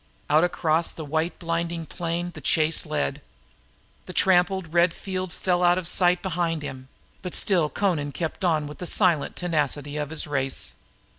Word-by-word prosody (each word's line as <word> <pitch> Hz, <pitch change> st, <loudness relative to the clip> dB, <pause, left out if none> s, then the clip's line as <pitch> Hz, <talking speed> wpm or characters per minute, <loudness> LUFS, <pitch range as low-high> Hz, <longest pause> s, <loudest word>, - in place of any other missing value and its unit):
Out 155 Hz, +2 st, +5 dB
across 165 Hz, -2 st, +1 dB
the 160 Hz, -, -7 dB
white 160 Hz, +4 st, -1 dB
blinding 170 Hz, -1 st, -2 dB
plain 175 Hz, +1 st, -3 dB
she 155 Hz, 0 st, +3 dB
led 150 Hz, -2 st, -1 dB
him. -, -, -18 dB, 0.9 s
The -, -, -7 dB
trampled 185 Hz, -2 st, +3 dB
red 170 Hz, 0 st, +4 dB
field 185 Hz, -2 st, -4 dB
fell 180 Hz, +1 st, 0 dB
out 175 Hz, 0 st, +5 dB
of 185 Hz, -3 st, -1 dB
sight 180 Hz, 0 st, +3 dB
behind 170 Hz, -4 st, -1 dB
him, 130 Hz, -2 st, -7 dB, 0.3 s
but 180 Hz, -, -4 dB
still 170 Hz, -7 st, +2 dB
Amra 165 Hz, -8 st, +1 dB
kept 165 Hz, +6 st, -4 dB
on 160 Hz, -4 st, +2 dB
with 150 Hz, +1 st, -9 dB
the 180 Hz, -, -4 dB
silent 175 Hz, -7 st, +2 dB
tenacity 150 Hz, -4 st, -1 dB
of 150 Hz, -1 st, -2 dB
his 160 Hz, -1 st, -3 dB
race. 135 Hz, -, -1 dB
165 Hz, 165 wpm, -25 LUFS, 150-180 Hz, 0.9 s, Out